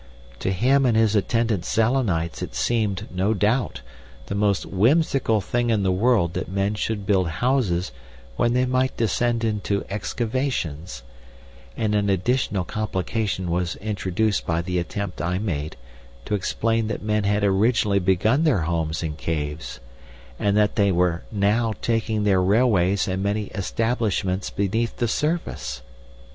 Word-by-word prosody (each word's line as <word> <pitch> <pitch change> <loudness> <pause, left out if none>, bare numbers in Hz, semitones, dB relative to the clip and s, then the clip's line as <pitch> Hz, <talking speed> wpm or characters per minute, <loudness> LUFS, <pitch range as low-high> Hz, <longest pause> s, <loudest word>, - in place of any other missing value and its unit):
To - - -1
him 130 +9 +3
and 115 -2 +2
his 110 -1 +3
attendant 110 -2 +1
Selenites 110 -9 0
it - - -5
seemed, 100 - 0
no 95 +4 0
doubt, 110 +6 0 0.4
the - - -5
most 100 -1 +1
whimsical 120 - +2
thing 120 +5 -1
in 110 -3 +2
the 95 - +2
world 95 -3 +2
that - - -4
men 100 +2 0
should 105 -1 -3
build 95 -3 +2
houses 95 - 0 0.4
when 120 - +1
they 125 +1 +2
might 130 +1 0
descend 115 +1 +1
into 105 -2 -1
excavations, 105 - -3 0.7
and 105 -1 0
an 100 -1 +1
additional 100 0 +1
complication 100 -1 -2
was 85 -1 -1
introduced 105 0 -1
by 85 0 0
the 90 0 -1
attempt 95 0 -4
I 90 +3 -1
made 80 -7 -3 0.5
to - - -3
explain 115 +3 0
that 110 - -4
men 105 0 0
had 105 +1 +1
originally 100 +1 +3
begun 100 - +2
their 145 - +3
homes 80 -1 -1
in 75 -2 -3
caves, 75 -1 -4 0.6
and 100 0 +2
that 105 -1 +2
they 100 -2 +4
were 90 -1 +1
now 110 +2 +1
taking 110 -2 0
their 95 -3 +3
railways 100 -2 +3
and 95 0 -2
many 100 +1 -1
establishments 100 -2 -1
beneath 110 +4 -1
the 120 - 0
surface. 150 - -2
105 Hz, 145 wpm, -23 LUFS, 90-115 Hz, 0.7 s, they